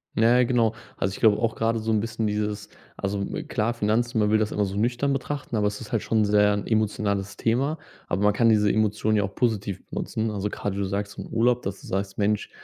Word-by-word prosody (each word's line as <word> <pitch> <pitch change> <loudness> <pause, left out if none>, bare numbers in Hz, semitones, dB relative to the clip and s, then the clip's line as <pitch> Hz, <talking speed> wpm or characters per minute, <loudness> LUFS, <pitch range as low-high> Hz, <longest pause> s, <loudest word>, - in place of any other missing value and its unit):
Na 115 +2 +5
ja, - - +5
genau. 115 -3 +2 0.2
Also, 95 - -1
ich - - -8
glaube 110 -2 +5
auch, 115 0 0
grade 115 0 0
so 110 0 -2
'n 110 - +3
bisschen 110 +1 -2
dieses 105 0 -2 0.3
also, 100 +1 -2
hm, 100 - -4
klar 110 +2 0
Finanzen, 115 +2 0
man 105 -1 +2
will 110 - +4
das 110 -1 0
immer 105 - +1
so 95 0 -5
nüchtern 120 +6 +1
betrachten, 135 -1 -4
aber 105 -1 +2
es 105 0 -3
ist - - -10
halt 115 -4 +1
schon 110 -2 +1
sehr 105 0 +4
'n 100 - -2
emotionales 100 -3 -1
Thema, 135 +7 0 0.3
aber 95 +4 -1
man 105 0 +4
kann 115 +2 +3
diese 105 -2 +4
Emotion 110 0 +1
ja 105 - +2
auch 100 +1 -5
positiv 105 -5 -1
benutzen. 110 0 -2
Also, 105 0 -2
grade, 100 -1 -4
wie - - -3
du - - 0
sagst, 100 +1 -3
im - - -6
Urlaub, 120 +2 +2
dass 100 0 -5
du - - -12
sagst: 95 0 -3
„Mensch, 105 0 0
105 Hz, 245 wpm, -25 LUFS, 100-115 Hz, 0.3 s, Na